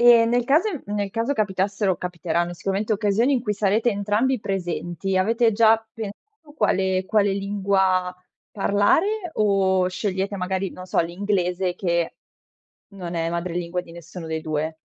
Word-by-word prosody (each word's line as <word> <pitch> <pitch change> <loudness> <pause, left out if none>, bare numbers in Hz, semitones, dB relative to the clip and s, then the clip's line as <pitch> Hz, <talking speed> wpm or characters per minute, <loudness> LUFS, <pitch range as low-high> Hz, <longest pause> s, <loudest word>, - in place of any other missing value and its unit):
E 240 -1 +7
nel 240 +1 +2
caso 305 - +3 0.2
nel 205 -1 -2
caso 230 +6 -1
capitassero, 195 -4 0
capiteranno 175 -1 -2
sicuramente, 195 +5 -2
occasioni 215 +5 +2
in 255 -4 +1
cui 210 -4 -1
sarete 210 +3 +2
entrambi 210 +6 +1
presenti 190 -1 -3
avete 225 +5 +3
già 225 +1 +5 0.2
pensato 295 - -10
quale 190 -9 +1
quale 205 -1 +2
lingua 195 -2 +1 0.4
parlare, 320 - +1
o 190 -3 +2
scegliete 195 +1 -2
magari, 190 +1 -2
non 185 - -9
so, - - +1
l'inglese 180 0 -1
che 170 -3 -1 0.8
non 180 -3 -6
è 165 -1 0
madrelingua 170 +1 -2
di 170 - -14
nessuno 170 0 -9
dei 160 0 -3
2? 155 0 -3
195 Hz, 140 wpm, -23 LUFS, 180-215 Hz, 0.8 s, E